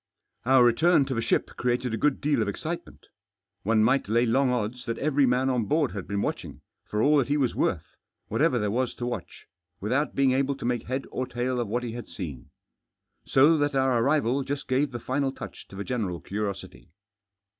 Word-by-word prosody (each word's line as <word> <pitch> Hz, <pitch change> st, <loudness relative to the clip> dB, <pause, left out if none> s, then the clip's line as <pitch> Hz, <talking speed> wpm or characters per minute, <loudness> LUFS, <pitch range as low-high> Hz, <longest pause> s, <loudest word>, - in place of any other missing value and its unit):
Our 130 Hz, -1 st, +6 dB
return 145 Hz, +6 st, +4 dB
to 135 Hz, -, -3 dB
the 115 Hz, -, -1 dB
ship 115 Hz, -, 0 dB
created 125 Hz, -1 st, 0 dB
a -, -, 0 dB
good 145 Hz, +4 st, +1 dB
deal 145 Hz, -4 st, +1 dB
of 110 Hz, -, 0 dB
excitement 160 Hz, -, -5 dB, 0.6 s
One 110 Hz, +1 st, +2 dB
might 130 Hz, -1 st, +2 dB
lay 115 Hz, +2 st, +3 dB
long 130 Hz, +3 st, +2 dB
odds 125 Hz, 0 st, -2 dB
that 115 Hz, -, -3 dB
every 145 Hz, -1 st, +2 dB
m<in 125 Hz, +2 st, +2 dB
on 120 Hz, -3 st, 0 dB
board 150 Hz, 0 st, +1 dB
had 100 Hz, -3 st, -6 dB
been 100 Hz, 0 st, -1 dB
watching, -, -, -4 dB, 0.2 s
for 105 Hz, +1 st, -1 dB
all 150 Hz, +1 st, +5 dB
that 130 Hz, -, 0 dB
he 145 Hz, +1 st, +1 dB
was 130 Hz, -5 st, +1 dB
worth, 80 Hz, -5 st, -1 dB, 0.3 s
whatever 125 Hz, -, +2 dB
there 105 Hz, -3 st, 0 dB
was 125 Hz, +2 st, -1 dB
to 120 Hz, -, -4 dB
watch, 120 Hz, -7 st, -6 dB, 0.3 s
without 130 Hz, +9 st, -1 dB
being 135 Hz, -1 st, +3 dB
able 135 Hz, +1 st, +1 dB
to 135 Hz, -, -7 dB
make 120 Hz, -1 st, -1 dB
head 130 Hz, +2 st, -2 dB
or 130 Hz, -, -3 dB
tail 125 Hz, +1 st, -2 dB
of 120 Hz, -, -1 dB
what 120 Hz, +4 st, -2 dB
he 120 Hz, -, -4 dB
had 120 Hz, +1 st, -7 dB
seen. 75 Hz, -, -7 dB, 0.8 s
So 150 Hz, +4 st, +5 dB
that 145 Hz, -1 st, 0 dB
our 130 Hz, -3 st, +2 dB
arrival 140 Hz, -1 st, +2 dB
just 140 Hz, +1 st, -4 dB
gave 135 Hz, +3 st, +1 dB
the 120 Hz, -, -5 dB
final 135 Hz, +3 st, -1 dB
touch -, -, -10 dB
to -, -, -13 dB
the 100 Hz, -, -4 dB
general 100 Hz, -8 st, -2 dB
curiosity. 100 Hz, -1 st, -5 dB
125 Hz, 210 wpm, -27 LUFS, 115-135 Hz, 0.8 s, Our